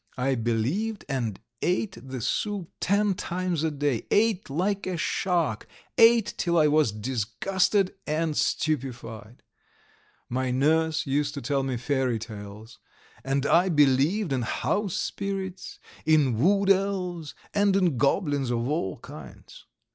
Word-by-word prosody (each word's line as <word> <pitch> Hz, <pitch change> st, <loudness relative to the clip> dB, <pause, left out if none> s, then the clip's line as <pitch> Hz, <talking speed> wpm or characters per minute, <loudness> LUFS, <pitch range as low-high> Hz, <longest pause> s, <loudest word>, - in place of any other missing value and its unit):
I 130 Hz, +1 st, +1 dB
believed, 130 Hz, -, -1 dB
and 120 Hz, -8 st, -2 dB, 0.2 s
ate 185 Hz, +3 st, 0 dB
the 130 Hz, -2 st, -6 dB
soup 195 Hz, -, -2 dB
ten 200 Hz, +1 st, +2 dB
times 180 Hz, -2 st, -2 dB
a 160 Hz, -, +2 dB
day, 145 Hz, -5 st, -1 dB
ate 210 Hz, -5 st, +2 dB
like 190 Hz, +8 st, -1 dB
a 185 Hz, -2 st, -2 dB
shark, 165 Hz, -, 0 dB, 0.3 s
ate 230 Hz, -1 st, +5 dB
till 170 Hz, -1 st, +1 dB
I 155 Hz, -, +5 dB
was 150 Hz, -5 st, +3 dB
disgusted 130 Hz, -, 0 dB
and 155 Hz, 0 st, 0 dB
stupefied. 120 Hz, -8 st, -2 dB, 0.8 s
My 130 Hz, +1 st, -1 dB
nurse 160 Hz, +5 st, +2 dB
used 145 Hz, +1 st, 0 dB
to 140 Hz, -, -4 dB
tell 135 Hz, +2 st, 0 dB
me 130 Hz, -2 st, -2 dB
fairy 130 Hz, -1 st, 0 dB
tales, 110 Hz, +1 st, -9 dB, 0.4 s
and 135 Hz, +1 st, 0 dB
I 175 Hz, +5 st, +4 dB
believed 150 Hz, +4 st, +3 dB
in 130 Hz, -, 0 dB
house 195 Hz, -, -1 dB
spirits, 195 Hz, -2 st, -4 dB, 0.3 s
in 145 Hz, -7 st, +3 dB
wood 195 Hz, +6 st, +4 dB
elves, 185 Hz, -5 st, -1 dB, 0.2 s
and 205 Hz, -1 st, +3 dB
in 180 Hz, -8 st, +2 dB
goblins 145 Hz, -2 st, +1 dB
of 120 Hz, 0 st, -1 dB
all 140 Hz, -, -2 dB
kinds. -, -, -12 dB
150 Hz, 130 wpm, -26 LUFS, 130-185 Hz, 0.8 s, ate